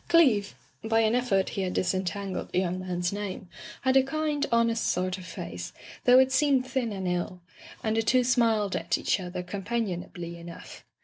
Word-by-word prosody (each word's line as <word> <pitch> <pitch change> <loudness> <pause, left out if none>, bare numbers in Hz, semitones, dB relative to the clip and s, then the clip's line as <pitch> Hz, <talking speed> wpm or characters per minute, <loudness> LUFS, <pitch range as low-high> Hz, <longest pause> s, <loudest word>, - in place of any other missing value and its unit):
Cleeve 235 - +4 0.2
— 130 - -38
^by 225 0 +3
an 220 - +2
effort 240 -6 +2
he 195 - -3
had 185 -1 -1
disentangled 185 +1 -2
the - - -1
young 185 0 0
man's 180 0 -2
name 200 -2 -5 0.2
— 210 - -13
had 260 0 +3
a 270 - +8
kind, 295 +1 -1
honest 230 -1 +2
sort 185 +1 0
of 185 - -10
face, 90 - -6 0.3
though 250 0 +8
it 260 0 +5
seemed 270 -2 +3
thin 255 -3 -1
and 190 -2 -3
ill, 180 +1 -2 0.4
and 220 0 0
the 225 - +3
two 250 +3 +3
smiled 230 -5 +2
at - - 0
each - - +1
other 180 -1 -5
companion 200 0 -2
ably 170 -1 -8
enough. 170 0 -10
205 Hz, 195 wpm, -28 LUFS, 180-245 Hz, 0.4 s, a